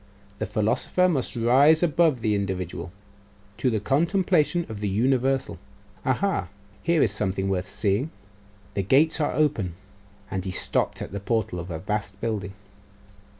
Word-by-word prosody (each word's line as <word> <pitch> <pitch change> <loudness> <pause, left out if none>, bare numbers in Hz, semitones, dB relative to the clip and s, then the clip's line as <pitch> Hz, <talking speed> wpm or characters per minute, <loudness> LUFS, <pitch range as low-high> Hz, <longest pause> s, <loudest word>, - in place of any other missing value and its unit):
The 110 - -2
philosopher 110 - +1
must 145 -9 0
rise 135 +8 +5
above 155 -5 +3
the 110 -1 +1
individual, 95 -3 -3 0.7
to 130 - +1
the 110 -3 0
contemplation 170 - +2
of 110 -2 -7
the 105 -1 -1
universal.... 130 +1 +1 0.4
Aha! 130 - 0 0.3
Here 170 -2 +3
is 110 - +2
something 95 -2 -1
worth 95 -1 -1
seeing, 105 +4 0
and - - -9 0.6
the 100 - 0
gates 145 - +3
are 145 - 0
open.' 130 - +1 0.6
And 95 -1 -2
he 95 - -4
stopped 95 - 0
at - - -8
the 100 - -4
portal 100 -3 -1
of 85 +2 -7
a 80 - -3
vast 100 +2 -3
building. 105 -4 -3
110 Hz, 150 wpm, -25 LUFS, 95-145 Hz, 0.7 s, rise